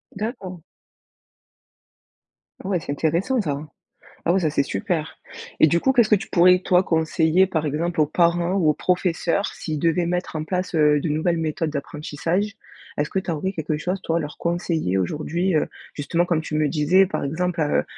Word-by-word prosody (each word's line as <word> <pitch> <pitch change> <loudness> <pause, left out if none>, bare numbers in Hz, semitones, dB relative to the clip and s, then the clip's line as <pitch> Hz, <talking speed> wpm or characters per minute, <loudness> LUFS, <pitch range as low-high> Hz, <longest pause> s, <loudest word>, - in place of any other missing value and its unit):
D'accord. 195 -5 -5 2.0
Ouais 185 -2 0
c'est 145 - -6
intéressant 170 - 0
ça. 145 -6 -2 0.7
Ah 170 - +3
oui 190 - +2
ça 155 - +1
c'est 140 - +2
super! 155 - -3 0.4
Et - - +8
du 170 +3 +2
coup 265 +6 +2
qu'est-ce 235 -4 +4
que 210 - +6
tu 195 - -5
pourrais 180 +1 +5
toi 180 0 +3
conseiller 160 +2 +2
par 160 -4 -1
exemple 160 +3 -2
aux 150 - +4
parents 170 +3 +1
ou 180 -6 +2
aux 150 - +4
professeurs 180 +1 0
s'ils 155 -3 -5
devaient 170 +2 +1
mettre 180 -1 -2
en 155 - -2
place, 180 +1 -3
heu, 150 -2 +4
de 160 - -2
nouvelles 160 +3 0
méthodes 160 0 -1
d'apprentissage. 165 +8 -3 0.4
Est-ce 145 +1 -1
que - - -3
tu 185 -2 -4
aurais 165 +5 -2
quelque 155 -3 -2
chose 180 +5 -2
toi, 165 +1 0
à - - +1
leur 150 -2 -6
conseiller 170 - -1
aujourd'hui? 160 - -1
Heu, 155 - +2 0.3
justement 160 +4 0
comme 170 -3 0
tu 155 - -8
me 155 -1 +2
disais 170 +6 +4
par - - -3
exemple, 170 +3 -2
heu 145 - +1
170 Hz, 185 wpm, -23 LUFS, 155-180 Hz, 2.0 s, Et